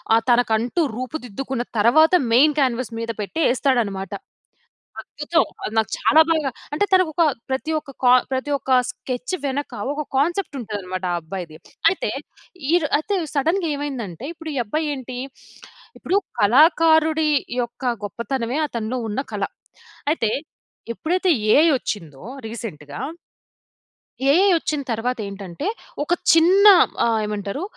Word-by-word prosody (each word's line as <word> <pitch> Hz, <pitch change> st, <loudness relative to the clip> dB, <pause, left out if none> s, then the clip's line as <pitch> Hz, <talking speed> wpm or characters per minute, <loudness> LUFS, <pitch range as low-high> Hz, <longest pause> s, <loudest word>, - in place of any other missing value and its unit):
ఆహ్, 230 Hz, -, +2 dB
తనకంటూ 240 Hz, +5 st, +2 dB
రూపుదిద్దుకున్న 255 Hz, -1 st, -4 dB
తర్వాత, 280 Hz, +9 st, +5 dB, 0.2 s
మెయిన్ 290 Hz, +5 st, +5 dB
క్యాన్వాస్ 255 Hz, -2 st, 0 dB
మీద 230 Hz, -, -5 dB
పెట్టి 210 Hz, +10 st, -5 dB
ఏస్తాడన్నమాట. 225 Hz, -7 st, 0 dB, 0.9 s
అద్భుతం. -, -, 0 dB, 0.2 s
అది 215 Hz, -, -4 dB
నాకు 220 Hz, -1 st, +2 dB
చాలా 315 Hz, -, +5 dB
బాగా 315 Hz, -4 st, +1 dB, 0.2 s
అంటే 355 Hz, +8 st, +2 dB
తనకొక 350 Hz, -3 st, +3 dB, 0.3 s
ప్రతి 265 Hz, +4 st, -2 dB
ఒక్క 300 Hz, -2 st, -13 dB
కా 245 Hz, -, +6 dB, 0.2 s
ప్రతి 260 Hz, +3 st, -2 dB
ఒక్క 270 Hz, -, -12 dB, 0.2 s
స్కెచ్ 250 Hz, +3 st, -5 dB
వెనక, 280 Hz, +1 st, -2 dB, 0.2 s
ఒక 300 Hz, +1 st, -4 dB
కాన్సెప్ట్ 340 Hz, +4 st, 0 dB
ఉంటదన్నమాట 195 Hz, -4 st, -5 dB
ఆ -, -, 0 dB
అబ్బాయిది. 165 Hz, -1 st, -7 dB, 0.3 s
అయితే 450 Hz, +6 st, -2 dB, 0.6 s
ఈర్ 340 Hz, -2 st, +3 dB
అయితే 395 Hz, +7 st, -2 dB, 0.2 s
సడెన్‌గా 330 Hz, +5 st, +1 dB
ఏమైందంటే, 260 Hz, -, -5 dB
ఇప్పుడు 325 Hz, -1 st, -7 dB
ఈ -, -, -3 dB
అబ్బాయి 310 Hz, +8 st, -2 dB
ఏంటి? 255 Hz, -2 st, -7 dB, 0.8 s
ఇప్పుడు 375 Hz, -, -2 dB, 0.2 s
కళాకారుడి 315 Hz, -, +4 dB, 0.3 s
యొక్క 240 Hz, +1 st, -7 dB, 0.2 s
గొప్పతనమే 235 Hz, -, -3 dB
అతనిలో 235 Hz, -1 st, -3 dB
ఉన్న 210 Hz, -, -2 dB
కళ. -, -, -2 dB, 0.7 s
అయితే 230 Hz, -9 st, 0 dB, 0.6 s
ఎప్పుడైతే 360 Hz, -, 0 dB, 0.2 s
ఏఐ 310 Hz, +3 st, +6 dB
వచ్చిందో, 160 Hz, -, -6 dB, 0.2 s
రీసెంట్‌గా 150 Hz, -11 st, -7 dB, 1.3 s
ఏఐ 360 Hz, +7 st, +5 dB
ఒచ్చిన 305 Hz, -2 st, -2 dB
తర్వాత 240 Hz, +3 st, -1 dB
ఏంటంటే, 195 Hz, -, -6 dB, 0.4 s
ఒక 320 Hz, -, 0 dB, 0.2 s
చిన్న 360 Hz, +5 st, +5 dB, 0.4 s
ఆహ్, 230 Hz, -1 st, +2 dB
ఏమంటారు? 210 Hz, -, -4 dB
260 Hz, 125 wpm, -22 LUFS, 220-315 Hz, 1.3 s, కా